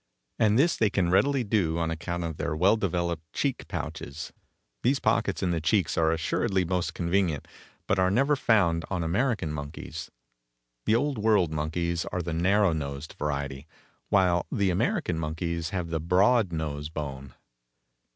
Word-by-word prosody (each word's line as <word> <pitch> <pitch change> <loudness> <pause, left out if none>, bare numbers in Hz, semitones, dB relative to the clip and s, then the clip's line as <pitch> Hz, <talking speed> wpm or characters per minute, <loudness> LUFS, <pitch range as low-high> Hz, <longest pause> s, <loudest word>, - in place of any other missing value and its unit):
And 110 -1 +4
this 165 +6 +3
they 110 - +3
can 90 -3 +1
readily 135 +7 +3
do 100 -7 +1
on 85 -1 0
account 85 +1 -3
of 80 -2 -4
their 80 - -2
well 95 +7 +4
developed 85 -5 -2
cheek 135 -3 -1
pouches. 70 +3 -6 0.5
These 135 +3 +2
pockets - - +1
in 90 - +1
the 85 -2 -1
cheeks 90 +1 +1
are 80 -1 +3
assuredly 90 +3 0
most 90 0 -1
convenient, 85 -4 0 0.4
but 95 - +1
are 95 0 +4
never 135 +9 +3
found 95 -11 +2
on 90 -3 -1
American 95 - 0
monkeys. 75 +1 -6 0.8
The 110 - +4
Old 140 0 0
World 105 -6 +3
monkeys 85 +3 -1
are 90 - -3
the 85 0 -3
narrow 95 +2 +3
nosed 70 0 -5
variety, 70 -1 -3 0.4
while 90 -3 +3
the 100 -2 +1
American 110 - 0
monkeys 80 +1 -3
have 90 -3 -3
the 80 - 0
broad 95 +5 +3
nose 75 -2 -3
bone. 70 -4 -6
85 Hz, 160 wpm, -27 LUFS, 80-100 Hz, 0.8 s, And